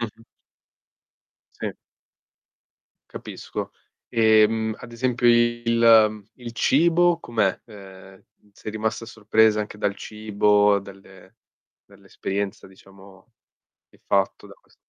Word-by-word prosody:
Mh-mh. 115 0 -7 1.4
Sì. - - -3 1.4
Capisco, - - -7 0.4
ehm, 110 -1 +3
ad 120 -1 -11
esempio 120 0 0
il 115 -2 +4
il 120 -2 -9
cibo 170 +6 +2
com'è? 110 - -1
Ehm, 95 -3 -14 0.3
sei 105 - -9
rimasta 110 +1 -3
sorpresa 110 -1 +2
anche 105 0 -5
dal 100 -1 -1
cibo, 105 -1 +1
dalle 95 +1 -16 0.5
dall'esperienza 100 0 -6
diciamo 95 +2 -19 0.6
che - - -24
hai - - -38
fatto 100 -1 0
da - - -14
ques - - -29
110 Hz, 100 wpm, -23 LUFS, 100-115 Hz, 1.4 s, il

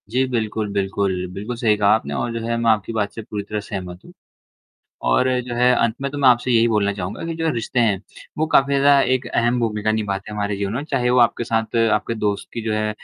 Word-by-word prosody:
जी 125 +4 +1
बिल्कुल, 110 -3 -2
बिल्कुल। 95 -2 -1
बिल्कुल 105 +6 -5
सही 110 -3 +2
कहा 100 -1 +3
आपने 110 - -4
और 120 - -2
जो 115 - -3
है 115 0 -1
मैं 115 0 +1
आपकी 110 +1 -1
बात 105 -2 -1
से 115 - -6
पूरी 105 -1 -5
तरह 105 +1 -4
सहमत 90 -3 -7
हूँ। - - -13 1.0
और 125 - +3
जो 120 0 -6
है 125 +1 +4
अंत 115 -1 +1
में 140 0 -2
तो 145 - -4
मैं 135 -2 +5
आपसे 125 +1 +3
यही 115 -1 +4
बोलना 105 -2 +1
चाहूँगा 95 -1 -5
कि 165 - -3
जो 165 0 -1
रिश्ते 120 +1 -1
हैं 105 -5 +2 0.4
वो 155 - +1
काफ़ी 140 -2 +3
ज़्यादा 140 0 +5
एक 130 -1 0
अहम 120 +1 +1
भूमिका 110 -2 0
निभाते 105 -2 -3
हैं - - -6
हमारे 100 -1 -1
जीवन 100 0 -3
में। 135 +4 -3
चाहे 125 -5 0
वो 125 - +3
आपके 120 0 +3
साथ 115 0 -1 0.2
आपके 105 +2 0
दोस्त 105 -2 -2
की 115 - -4
जो 110 0 -2
है 110 0 0
110 Hz, 245 wpm, -21 LUFS, 105-120 Hz, 1.0 s, मैं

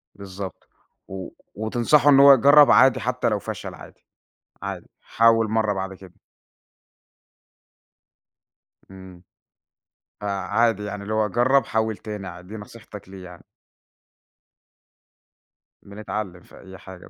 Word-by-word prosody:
بالضبط، 95 -2 -9 0.4
و 95 -1 -7 0.3
وتنصحه 120 +7 +2
إن 135 - +6
هو 140 0 +9
يجرب 140 +3 +6
عادي 130 -1 +5
حتى 125 +2 -1
لو 105 -1 -1
فشل - - -7
عادي، - - -16 0.6
عادي. - - -6
حاول 115 -1 +2
مرّة 110 -1 0
بعد 95 0 -5
كده. 95 -2 -15 2.8
امم. 95 -2 -14 1.0
آآ، - - -3
عادي 105 +2 0
يعني 105 0 -6
اللي 105 - -5
هو 110 -1 +1
جرّب، 120 +4 +2
حاول 110 -1 -2
تاني 105 -3 -8
عا 90 - -10
دي 95 +5 -12
نصيحتك 105 -2 -13
ليه 95 -1 -11
يعني. 90 -1 -14 2.4
بنتعلم 100 -2 -7
في - - -18
أي 95 0 -13
حاجة 95 -2 -13
105 Hz, 120 wpm, -22 LUFS, 95-115 Hz, 2.8 s, هو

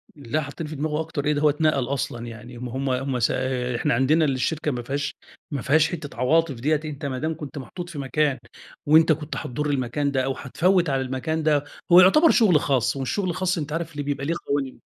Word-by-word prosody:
لأ 145 +1 -2
حطني 150 +2 -6
في 155 - -7
دماغه 150 +2 -1
أكتر 160 -2 -4
إيه، 150 - +3
ده 145 - -1
هو 150 - +5
اتنقل 150 -2 +1
أصلًا 120 -3 -3
يعني 115 +1 -10
ما 125 0 -6
هُم 135 +1 -1
هُم 130 0 -1
س 115 - +2 0.4
إحنا - - +1
عندنا 145 +6 +3
الشركة 145 +3 -1
ما 125 -2 -3
فيهاش 140 +3 -3 0.4
ما 140 -4 -2
فيهاش 155 +2 +3
حتة 155 -4 -7
عواطف 155 +3 +2
ديّة، 145 +6 +1
أنت 150 -1 -6
ما 130 -2 -3
دام 160 +2 -2
كنت 150 -1 -8
محطوط 175 +6 -7
في 150 -4 -7
مكان، 140 0 0 0.5
وأنت 160 +2 +6
كنت 150 0 -2
هتضر 150 +4 -3
المكان 140 +1 -1
ده 130 -2 0
أو 135 - -1
هتفوّت 175 +6 +1
على 135 -1 +1
المكان 130 +5 -2
ده 150 -2 +2 0.3
هو 175 - +10
يعتبر 305 - +6
شغل 200 -10 +5
خاص، 130 -3 +1
والشغل 180 +9 -1
الخاص 180 +1 -1
أنت 150 -2 -4
عارف 165 -1 -4
ل 145 - -2
بيبقى 140 -1 -3
ليه 165 +3 0
قوانين. 140 -2 -2
145 Hz, 215 wpm, -24 LUFS, 130-160 Hz, 0.5 s, هو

